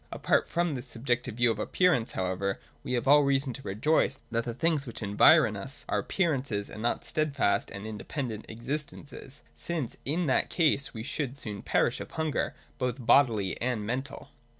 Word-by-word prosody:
Apart - - +1
from 170 -2 0
this 130 -1 -6
subjective 120 -1 -2
view 120 0 +3
of 110 - -4
Appearance, 130 0 +2
however, 95 +1 -1 0.2
we - - -3
have 120 +1 -1
all 145 +2 +7
reason 135 -2 +1
to 135 - -9
rejoice 135 +5 +1
that 115 0 0
the 120 - -3
things 155 -1 +1
which 115 - -7
environ 110 +4 +5
us 100 +8 -6
are - - +1
appearances 135 - -1
and 105 - -7
not 120 - -1
steadfast 145 -9 0
and 100 +1 -7
independent 110 +1 -5
existences; 140 +3 -5
since 160 -8 -4
in 165 +6 0
that 130 - +2
case 150 -5 +2
we 110 -2 -6
should 140 +1 -3
soon 105 -7 -5
perish - - +1
of - - -7
hunger, 160 -2 -1 0.2
both 125 -1 -2
bodily 115 -8 +3
and 120 -4 -1
mental. 130 +5 -4
125 Hz, 175 wpm, -29 LUFS, 110-145 Hz, 0.2 s, all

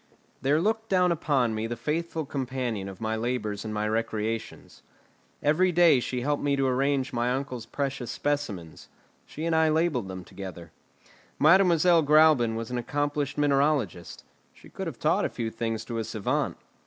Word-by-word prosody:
There 145 +3 +2
looked 220 +4 -1
down 180 -2 +3
upon 140 -8 +1
me 110 +1 -2
the 120 - -4
faithful 160 +4 -2
companion 125 -7 -3
of 95 - -10
my 110 0 -1
labours 110 -3 -2
and 110 - -5
my 105 0 -1
recreations. 110 0 -3 0.6
Every 175 +5 +3
day 170 -5 +5
she 125 0 -3
helped 145 +3 0
me 140 -1 +1
to 135 -1 +1
arrange 135 +1 0
my 120 +1 0
uncle's 130 -3 -4
precious 135 -4 -3
specimens; 105 - -3 0.4
she 155 - -6
and 165 -1 +1
I 160 0 +4
labelled 155 - +1
them 95 -1 -7
together. 90 -4 -9 0.7
Mademoiselle 170 0 +5
Gräuben 150 -6 +5
was 115 +1 -5
an 125 - -1
accomplished 145 +3 -2
mineralogist; 140 - 0 0.3
she - - -16
could - - -6
have - - -6
taught - - +1
a - - 0
few 115 -2 -4
things 115 -1 -3
to 115 -1 -4
a - - -1
savant. 110 -1 -2
130 Hz, 165 wpm, -27 LUFS, 115-150 Hz, 0.7 s, day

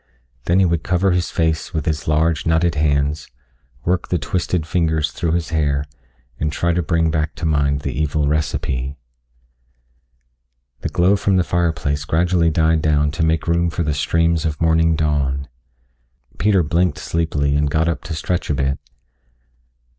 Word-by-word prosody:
Then 85 - +2
he 95 - +5
would 85 -2 +1
cover 95 +3 +1
his 90 -1 0
face 80 +1 -1
with 80 - -1
his 80 -1 -2
large, 80 +1 +1
knotted 80 +1 +2
hands, 75 -1 0 0.6
work 90 0 0
the 90 - 0
twisted 85 0 -2
fingers 80 -3 0
through 85 +1 -2
his 85 -3 -1
hair, 75 -3 0 0.5
and 75 0 -1
try 85 +2 0
to 90 - +1
bring 80 0 +1
back 80 -1 -1
to - - -5
mind 70 -2 +1
the - - -3
evil 75 -1 0
recipe. 70 -3 -2 1.8
The - - -3
glow 90 +3 +3
from 100 -1 +1
the 90 - +3
fireplace 80 -4 -1
gradually 85 +2 +2
died 80 0 +2
down 75 -1 +2
to 80 +2 -2
make 80 0 0
room 85 0 +2
for 85 +1 -2
the 75 -1 0
streams 85 +2 +1
of 80 -3 -2
morning 80 0 +3
dawn. 70 -3 0 0.9
Peter 100 -4 +3
blinked 85 0 +1
sleepily 75 -3 -1
and 75 0 +1
got 80 +3 +1
up 85 - -2
to 80 -1 -4
stretch 90 +3 -2
a 75 - +1
bit. 70 0 -1
80 Hz, 165 wpm, -20 LUFS, 75-85 Hz, 1.8 s, he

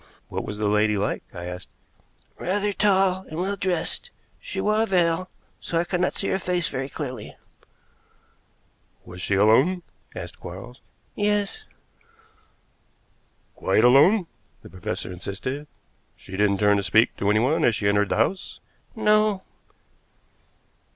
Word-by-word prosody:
"What - - -3
was 105 - -6
the 105 - -1
lady 105 0 +2
like?" 100 +2 -1
I 85 -1 -7
asked. 90 +1 -7 0.7
"Rather 205 +3 0
tall 190 -2 +2
and 155 - -5
well 195 +3 -1
dressed. 185 -3 -1 0.3
She - - -6
wore 215 +1 +2
a 225 - +1
veil, 180 -1 +1 0.3
so 170 - -3
I 165 - +3
could 180 +1 -2
not 180 - +1
see 195 - -2
her 190 - 0
face 180 -4 -1
very 135 +1 -4
clearly." 130 -8 -6 1.7
"Was 90 0 -9
she 95 - 0
alone?" 130 - +4 0.3
asked - - -7
Quarles. 95 +9 -9 0.3
"Yes." 210 - 0 1.9
"Quite - - +2
alone?" 150 - +6 0.4
the - - -12
professor 90 0 -5
insisted. 130 +11 -5 0.5
"She - - -16
didn't 100 +1 +2
turn 105 0 +4
to - - +1
speak 110 +5 +3
to 100 - 0
anyone 120 +9 +2
as 115 - +4
she 100 - -1
entered 100 0 +2
the - - 0
house?" 150 - -1 0.4
"No." 215 -2 +3
145 Hz, 140 wpm, -24 LUFS, -, 1.9 s, alone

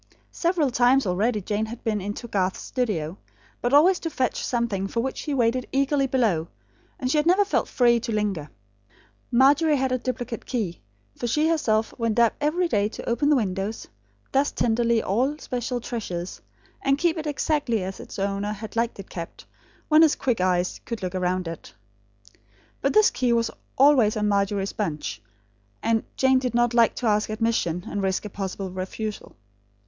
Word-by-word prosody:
Several 335 -6 +1
times 250 +3 +4
already 210 +4 0
Jane 210 +3 -2
had 235 +2 -9
been 215 -3 -1
into 205 +5 -5
Garth's 190 -4 -1
studio, 195 - -2 0.4
but 245 - 0
always 340 +6 +5
to 330 - -3
fetch 260 -5 -1
something 230 -6 -1
for 230 - -3
which 265 +2 -3
he 295 - -3
waited 245 0 +1
eagerly 275 0 +2
below; 220 -11 +1 0.5
and 255 -2 -1
she 305 - +2
had 300 - 0
never 380 +4 +5
felt 405 - 0
free 240 -2 +3
to 235 0 -4
linger. 200 -8 -1 0.8
Margery 290 +5 +5
had 265 -1 0
a 255 - +1
duplicate 245 -2 -4
key; 210 -9 -3 0.3
for 240 - -3
she 300 +7 +2
herself 225 -9 +1
went 230 -1 0
up 235 -1 +5
every 340 +5 +1
day 205 -8 +1
to - - -9
open 240 +5 +1
the 300 - +5
windows, 205 -2 -2 0.4
dust 275 +2 +1
tenderly 235 0 +2
all 255 +9 0
special 250 -3 -3
treasures; 190 -7 -5 0.4
and 275 0 +2
keep 340 +1 +1
it 315 -2 -4
exactly 280 -7 0
as 190 +1 -6
its - - -9
owner 200 +1 -1
had 215 +1 -8
liked 230 +1 0
it 195 - -8
kept, 170 -2 -8 0.4
when 310 0 +6
his 320 -2 +5
quick 240 -7 -1
eyes 180 -1 0
could 230 -4 -6
look 180 0 -3
around 185 -1 -1
it. 165 -1 -8 1.1
But 275 - +1
this 430 -1 +5
key 250 -2 +1
was 230 -1 +1 0.3
always 260 -6 +5
on 210 0 +1
Margery's 200 -1 0
bunch; 150 - -3 0.6
and 225 -1 +2
Jane 265 -1 +4
did 250 -2 -3
not 240 0 +3
like 235 -2 +4
to - - -4
ask 210 -1 +2
admission, 215 -6 -1
and 205 - -3
risk 190 +1 -1
a 210 - -6
possible 190 -1 -4
refusal. 195 +3 -5
230 Hz, 180 wpm, -25 LUFS, 200-265 Hz, 1.1 s, when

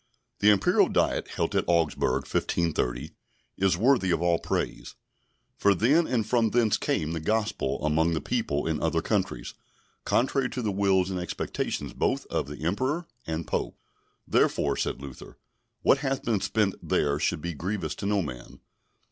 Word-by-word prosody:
The 105 - +5
Imperial 100 -2 +4
Diet - - +1
held - - -2
at - - +3
Augsburg, 75 -5 +1
1530, 75 -3 -1 0.5
is 95 -2 +2
worthy 120 -2 +3
of 90 - +2
all 85 -1 +2
praise; - - -3 0.6
for 100 -1 +4
then 145 - +3
and 115 -4 0
from 115 0 +2
thence 115 -2 +3
came 80 +1 -1
the 80 - -2
Gospel 105 -5 -1
among 80 +2 +2
the - - 0
people 70 0 -1
in 80 -2 -1
other - - 0
countries, - - -1 0.5
contrary 130 +1 +1
to 125 - -4
the 105 - 0
wills 95 -1 +2
and 90 - -2
expectations 90 -2 -3
both - - 0
of 70 - -1
Emperor 130 - -1 0.2
and 80 0 -3
Pope; - - -3 0.5
therefore, - - +2
said - - -2
Luther, 70 -2 -10 0.5
what 135 - +5
hath 135 -1 -2
been 110 -5 0
spent 105 -4 +1
there 70 0 +1
should - - 0
be 85 0 -3
grievous 90 0 -3
to 100 - -5
no 100 -2 +1
man. 65 -5 -8
95 Hz, 160 wpm, -27 LUFS, 80-110 Hz, 0.6 s, The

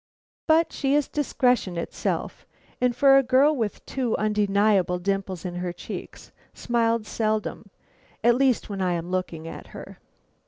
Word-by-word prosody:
But 320 +1 +3
she 275 0 +1
is 295 -1 +2
discretion 250 -10 0
itself, 170 - -3 0.3
and 250 -1 +2
for 275 0 +6
a - - +4
girl 270 +4 +4
with 225 -6 -3
two 250 -4 -1
undeniable 205 -3 +2
dimples 190 -1 -3
in 180 - -4
her 180 0 -3
cheeks, 175 - -9 0.2
smiles 230 -2 0
seldom 215 -1 -2 0.5
at 240 - +6
least 260 -1 +2
when 200 -2 -5
I 180 -1 +1
am 170 +1 -4
looking 175 -3 -3
at - - -9
her. - - -11
215 Hz, 150 wpm, -25 LUFS, 185-255 Hz, 0.5 s, for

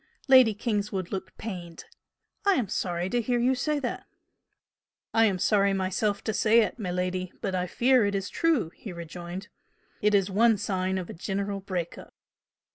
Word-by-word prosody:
Lady 255 -5 +7
Kingswood 205 -4 -2
looked 190 -1 -5
pained. 175 -6 -7 0.6
"I 400 - +4
am 230 -7 -1
sorry 175 -3 -1
to 245 - +1
hear 245 +2 0
you 245 +2 +3
say 300 +4 0
that!" 250 - -4 1.1
"I 225 0 +5
am 195 -4 +1
sorry 200 +1 +3
myself 195 +2 -1
to 220 - -1
say 225 +2 +4
it, 220 - -2
miladi, 185 -1 -2
but 195 - -3
I 180 0 -1
fear 250 +5 +3
it 200 - -1
is 195 0 -2
true!" 315 - +1
he 205 - -9
rejoined 175 +4 -7 0.5
"It 210 0 +3
is 195 -1 +2
one 225 +2 +4
sign 190 -1 -1
of 180 -2 -5
a - - -8
general 200 +3 -3
break 185 -3 -4
up." - - -14
200 Hz, 175 wpm, -27 LUFS, 185-225 Hz, 1.1 s, Lady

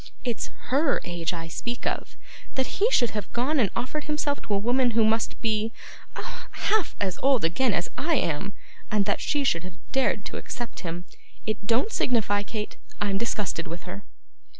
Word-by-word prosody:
It's 240 -3 -1 0.2
HER 280 +2 +4
age 170 -1 -1
I 165 -2 -4
speak 240 +9 -4
of. - - -2 0.4
That 265 +8 -1
he 440 - +6
should 245 - +4
have 210 -1 -4
gone 270 +5 +2
and 215 -6 +4
offered 260 +5 -2
himself 300 -1 0
to 205 - -1
a - - +4
woman 240 +2 +3
who 225 - +7
must 220 +1 +2
be 220 -1 +1 0.4
ah, - - -6
half 435 -3 +1
as 190 -3 -1
old 265 -7 +4
again 230 +9 +3
as 175 -3 +1
I 325 +2 +2
am 195 - 0 0.4
and 210 -2 +3
that - - +1
she 290 -1 +1
should 170 -11 +2
have 180 -1 -8
dared 265 0 +2
to - - -4
accept 240 -2 -5
him! 175 0 -4 0.4
It 215 -1 -2
don't 245 - +3
signify, 215 - +2
Kate; 210 +1 -4 0.2
I'm 200 -1 +1
disgusted 210 -7 -1
with 170 +1 -6
her! 195 +2 -7
225 Hz, 185 wpm, -27 LUFS, 195-265 Hz, 0.4 s, who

